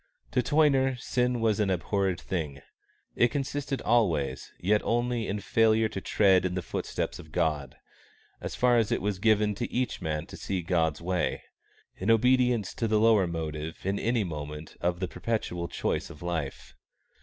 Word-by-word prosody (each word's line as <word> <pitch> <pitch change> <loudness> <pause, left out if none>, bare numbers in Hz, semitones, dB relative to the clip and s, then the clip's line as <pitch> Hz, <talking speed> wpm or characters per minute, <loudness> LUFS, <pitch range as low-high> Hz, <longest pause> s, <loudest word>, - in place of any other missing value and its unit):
To 125 - +2
Toyner 135 -2 +3
sin 125 -1 0
was 110 -2 +2
an 105 -2 +2
abhorred 95 0 0
thing. 75 -9 -4 0.5
It 120 - +5
consisted 140 +1 -3
always, 80 - +1
yet 105 +4 +2
only, 120 -1 0
in 100 +1 -2
failure 110 +1 +3
to 95 - -5
tread 95 -3 +4
in 90 -1 -1
the 90 - -2
foot - - -4
prints - - -2
of 80 - -12
God, 75 -5 -1 0.7
as - - -5
far 125 -1 +4
as 110 - 0
it - - +2
was 100 -1 -2
given 105 0 +3
to 115 +4 -4
each 125 -4 -1
man 75 -2 -2
to - - -10
see 95 -3 -3
God's 80 -2 0
way 90 0 -1 0.5
in 95 - -2
obedience 125 -2 +3
to 115 - -1
the 110 0 +2
lower 110 -4 +5
motive 80 -1 -5
in 100 +1 0
any 115 -1 +1
moment 75 -2 -6
of 85 +1 0
the 95 - 0
perpetual 90 -6 -3
choice - - -2
of 75 - -11
life. 80 -6 -4
100 Hz, 175 wpm, -28 LUFS, 85-115 Hz, 0.7 s, It